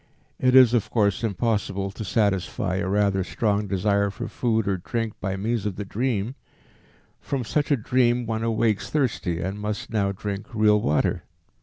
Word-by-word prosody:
It 130 0 +3
is 130 -3 +8
of 120 -4 +1
course 105 -2 +1
impossible 100 -3 -1
to 110 - -7
satisfy 95 -3 0
a 95 0 -1
rather 100 -1 +2
strong 105 +1 0
desire 100 +1 +1
for 100 - -6
food 110 -4 0
or 95 -1 +1
drink 115 +4 -3
by 95 0 -2
means 105 +2 -1
of 100 - -3
the 105 - -5
dream; 115 +1 -1 0.9
from 135 -3 -3
such 145 +6 -1
a 145 - +3
dream 120 +1 +2
one 110 -1 -2
awakes 115 -2 0
thirsty 115 - -1
and 95 +3 -4
must 105 +1 -4
now 100 -3 +1
drink 100 +1 -5
real 105 -1 +4
water. 75 -3 +1
105 Hz, 170 wpm, -24 LUFS, 100-115 Hz, 0.9 s, is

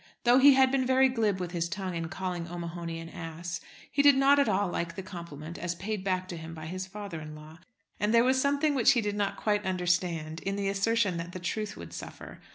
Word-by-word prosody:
Though 245 +2 +6
he 275 0 +8
had 265 -1 +5
been 270 -1 +2
very 260 +1 +4
glib 220 -6 0
with 180 -1 -4
his 170 -1 -2
tongue 190 -2 -4
in 165 -1 -3
calling 180 -2 -4
O'Mahony 170 -1 -5
an 165 - -8
ass, 165 +1 -6 0.3
he 285 - +3
did 285 -1 +7
not 275 +1 +5
at 280 - +3
all 200 0 +2
like 170 -1 -3
the 190 - -5
compliment 170 -3 -8
as 175 0 -2
paid 200 +2 -4
back 185 -1 -1
to 175 - -5
him 165 0 -8
by 155 -1 -8
his 185 +3 -5
father 200 -4 -7
in 155 0 -8
law. 155 +2 -13 0.4
And 210 +1 +1
there 230 0 +5
was 260 +1 +3
something 285 +2 +2
which 265 0 +5
he 240 - +2
did 205 -1 -2
not 205 -1 -1
quite 210 -1 0
understand 175 -4 -1
in 195 +2 -3
the 200 -1 -1
assertion 200 -1 +1
that 170 +1 -6
the 185 - -5
truth 210 +4 -3
would 85 0 -9
suffer. - - -9
185 Hz, 240 wpm, -29 LUFS, 170-225 Hz, 0.4 s, he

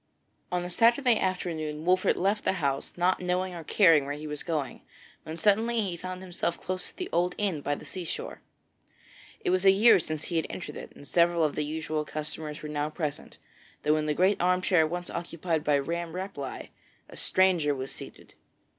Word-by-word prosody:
On 180 0 -1
a - - -5
Saturday 235 +4 +4
afternoon 160 -5 -2
Wolfert 185 +1 +3
left 200 +4 +1
the - - +2
house 140 -6 -1
not 180 +1 +2
knowing 180 +1 -1
or 170 -2 -7
caring 165 -5 +5
where 145 - -2
he 150 +1 -8
was 150 -1 -4
going, 150 -6 -3 0.4
when 160 +1 -6
suddenly 225 +4 +2
he 190 -4 -2
found 185 +2 -6
himself 175 -2 -2
close 185 0 -4
to - - -19
the 365 - -3
old 180 +1 +1
inn 190 -8 -1
by 145 +1 -1
the - - -11
sea 185 - -6
shore. 165 - -5 1.0
It - - 0
was 185 0 +2
a 195 - +7
year 200 +2 +7
since 155 -1 -4
he 170 - -2
had 160 - 0
entered 180 - -6
it, - - -8
and 145 - -13
several 170 -1 +3
of 150 - +1
the 150 - -1
usual 155 0 -2
customers 150 0 -5
were 150 - -5
now 150 0 -1
present, 155 -2 -5 0.5
though 150 +1 +3
in 155 0 -1
the 150 - +1
great 185 +4 +3
armchair 180 -2 +3
once 175 +2 -4
occupied 170 -2 -2
by 150 -2 +3
Ramm 170 +4 -3
Rapelye 180 -8 -5 0.4
a - - -13
stranger 175 -6 +2
was 130 0 -5
seated. - - -11
170 Hz, 200 wpm, -28 LUFS, 150-185 Hz, 1.0 s, a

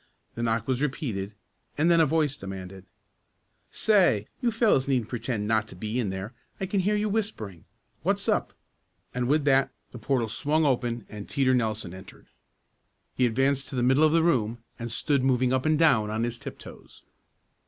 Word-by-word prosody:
The 115 - -5
knock 115 -1 0
was 130 0 0
repeated 115 -9 -3 0.4
and 160 +4 +3
then 170 - +5
a 160 - +5
voice 150 -1 +1
demanded: 95 -3 -8 0.8
"Say, 185 - +3 0.2
you 245 - +2
fellows 220 - +2
needn't 125 -5 0
pretend 115 -3 -3
not 110 -1 +1
to - - -11
be 110 +3 -3
in 110 -5 -1
there. 95 +5 -5 0.3
I 190 - -1
can 195 +1 -1
hear 205 +3 +1
you 210 +1 0
whispering. 200 - -3 0.4
What's - - -1
up?" - - +1 0.6
and 125 -1 -1
with 145 +1 +2
that 135 -1 +4 0.2
the 120 - -9
portal 120 0 0
swung 150 +7 +1
open 120 -4 0
and 105 -1 -9
Teeter 130 -2 +2
Nelson 110 -7 -1
entered. 95 0 -13 0.9
He 125 - +2
advanced 135 +3 +1
to - - -7
the 125 - 0
middle 130 +4 +4
of 155 - +5
the 165 0 +3
room 120 -8 +1 0.2
and 120 -1 -5
stood 140 +3 +1
moving 130 -1 +2
up 130 +3 +1
and 155 0 +3
down 135 -10 +4
on 110 +2 -1
his 120 0 -3
tiptoes. - - -11
125 Hz, 185 wpm, -27 LUFS, 110-150 Hz, 0.9 s, then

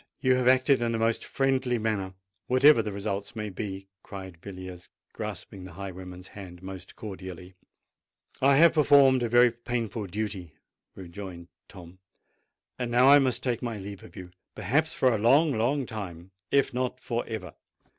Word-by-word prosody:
You 130 0 +3
have 125 -1 +1
acted 130 +1 +4
in 115 -1 0
a - - 0
most 115 0 0
friendly 130 -2 0
manner—whatever 110 +6 +2
the 105 -1 -4
result 100 +1 -4
may 105 -1 -4
be!" 95 0 -6
cried 95 -4 -10
Villiers, 95 -2 -9 0.2
grasping 95 - -6
the 90 -2 -10
highwayman's 90 0 -8
hand 90 -3 -11
most 95 -1 -9
cordially. 95 -4 -8 0.9
"I 135 +1 +5
have 165 +4 +6
performed 140 -4 +5
a 120 - 0
very 120 +1 +6
painful 115 -3 -4
duty," 95 -4 -5 0.4
rejoined 90 -1 -9 0.2
Tom: 90 -1 -13 0.8
"and 125 -1 -2
now 125 +3 +5
I 145 +1 +9
must 130 -3 0
take 125 -3 -1
my 120 -3 -3
leave 100 0 -8
of - - -14
you—perhaps 95 - -3
for 130 -2 +2
a 110 - 0
long, 140 +7 +4
long 130 +5 0
time—if 95 +5 -3
not 125 0 -2
for 120 -1 -2
ever." 100 -7 -6
110 Hz, 155 wpm, -27 LUFS, 95-125 Hz, 0.9 s, I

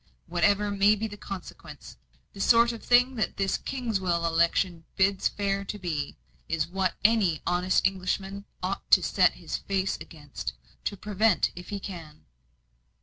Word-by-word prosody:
Whatever 200 +4 +2
may 200 +1 +4
be 215 +1 -3
the 210 - -9
consequence, 195 -2 -9 0.4
the 200 - -11
sort 235 +2 +5
of 230 - -9
thing 250 +2 +4
that 215 - -1
this 195 -1 +1
Kingswell 190 -10 -1
election 170 +1 +1
bids 195 0 +2
fair 200 -1 -1
to 210 - -5
be, 160 -7 -3 0.3
is 160 -1 +1
what 185 0 -1
any 205 -8 +3
honest 180 +1 +1
Englishman 195 +1 -1 0.2
ought - - -3
to - - +6
set - - +3
his - - -5
face 195 -1 -1
against, 145 - -7 0.4
and 200 - -12
prevent 210 -1 +2
if 180 0 -10
he 205 - -3
can." 165 -6 -9
195 Hz, 150 wpm, -27 LUFS, 175-205 Hz, 0.4 s, to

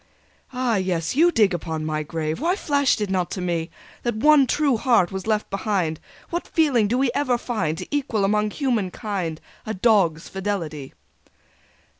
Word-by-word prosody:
"Ah 250 -3 0
yes! 180 -2 -1
You 340 +4 +5
dig 215 - +3
upon 160 -2 -3
my 155 0 -1
grave... 155 +2 -3
Why 345 +4 +2
flashed 285 - +1
it 205 -2 -1
not 180 -2 0
to - - -5
me 170 -2 -2 0.3
That 240 -2 -2
one 285 +3 +5
true 285 -2 +2
heart 230 -7 +3
was 190 +1 -5
left 215 -1 0
behind! 190 -6 -1 0.3
What 345 +1 -3
feeling 275 -10 +2
do 240 +4 0
we 260 -2 +2
ever 255 -4 +1
find 185 -11 -2
To - - -6
equal 235 -8 0
among 210 +1 +1
human 235 -6 -1
kind 180 -6 -4 0.2
A 220 - -4
dog's 190 -6 +2
fidelity!" 170 -8 -4
205 Hz, 170 wpm, -23 LUFS, 175-250 Hz, 0.3 s, You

